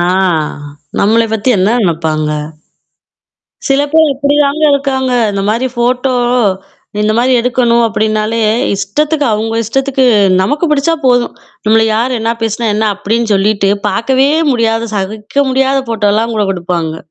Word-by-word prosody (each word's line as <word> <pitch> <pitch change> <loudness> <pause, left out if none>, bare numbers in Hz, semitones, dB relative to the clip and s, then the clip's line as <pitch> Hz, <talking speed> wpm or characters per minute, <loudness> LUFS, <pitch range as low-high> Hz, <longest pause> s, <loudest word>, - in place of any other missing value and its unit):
ஆ - - +2 1.0
நம்மள 225 +3 +3
பத்தி 220 +3 -1
என்ன 190 +3 +2
நினைப்பாங்க? 160 -3 -1 1.4
சில 275 +1 +3
பேர் 315 -2 +4
இப்படிதாங்க 285 +2 0
இருக்காங்க. 265 -2 -1 0.2
இந்த 200 -1 -2
மாரி 235 +4 0
ஃபோட்டோ 250 +2 0 0.9
இந்த 210 0 +1
மாரி 255 +2 +2
எடுக்கணும் 235 -1 +1
அப்டின்னாலே, 215 +1 -1 0.4
இஷ்டத்துக்கு 295 +10 -1
அவங்க 220 +1 -2
இஷ்டத்துக்கு 265 +3 0 0.4
நமக்கு 290 - 0
பிடிச்சா 300 +3 +1
போதும். 245 -1 +2 0.3
நம்மள 225 +1 +4
யார் 245 +3 0
என்ன 225 +1 -1
பேசினா, 225 +1 -1
என்ன 220 +1 0
அப்டின்னு 220 +3 -1
சொல்லிட்டு 200 0 +1 0.2
பாக்கவே 265 +3 +1 0.2
முடியாது, 230 -2 0
சகிக்க 210 +8 -2
முடியாத 270 +1 +1
ஃபோட்டோலாம் 220 +1 0
கூட 210 -1 0
குடுப்பாங்க. 170 -3 -3
230 Hz, 125 wpm, -12 LUFS, 210-265 Hz, 1.4 s, பேர்